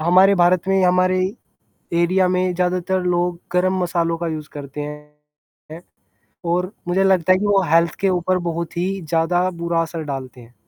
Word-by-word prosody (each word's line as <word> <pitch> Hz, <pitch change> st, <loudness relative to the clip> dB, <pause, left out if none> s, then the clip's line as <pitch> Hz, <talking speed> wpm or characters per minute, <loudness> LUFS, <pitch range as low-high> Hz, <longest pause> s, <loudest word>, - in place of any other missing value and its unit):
हमारे 185 Hz, +4 st, +5 dB
भारत 180 Hz, 0 st, +2 dB
में 195 Hz, -, +2 dB
ही, 190 Hz, -, +3 dB
हमारे 185 Hz, +1 st, +3 dB, 0.8 s
एरिया 185 Hz, +2 st, +2 dB
में 185 Hz, 0 st, 0 dB
ज़्यादातर 180 Hz, +1 st, 0 dB
लोग 175 Hz, -1 st, 0 dB
गरम 185 Hz, +1 st, +1 dB
मसालों 170 Hz, -1 st, 0 dB
का 170 Hz, -, -3 dB
यूज़ 155 Hz, -1 st, -5 dB
करते 145 Hz, 0 st, -8 dB
हैं। 150 Hz, 0 st, -8 dB, 1.4 s
और 180 Hz, +2 st, -1 dB, 0.2 s
मुझे 190 Hz, +2 st, +2 dB
लगता 185 Hz, -2 st, +3 dB
है -, -, +2 dB
कि 205 Hz, -, -2 dB
वो 200 Hz, -1 st, +3 dB
हेल्थ 165 Hz, -1 st, +3 dB
के 195 Hz, -, +2 dB
ऊपर 185 Hz, 0 st, +1 dB
बहुत 170 Hz, +1 st, -5 dB
ही 180 Hz, +2 st, 0 dB
ज़्यादा 170 Hz, +3 st, +1 dB
बुरा 170 Hz, -1 st, -1 dB
असर 165 Hz, 0 st, -4 dB
डालते 130 Hz, -3 st, -6 dB
हैं। 120 Hz, +1 st, -18 dB
175 Hz, 175 wpm, -20 LUFS, 165-185 Hz, 1.4 s, हमारे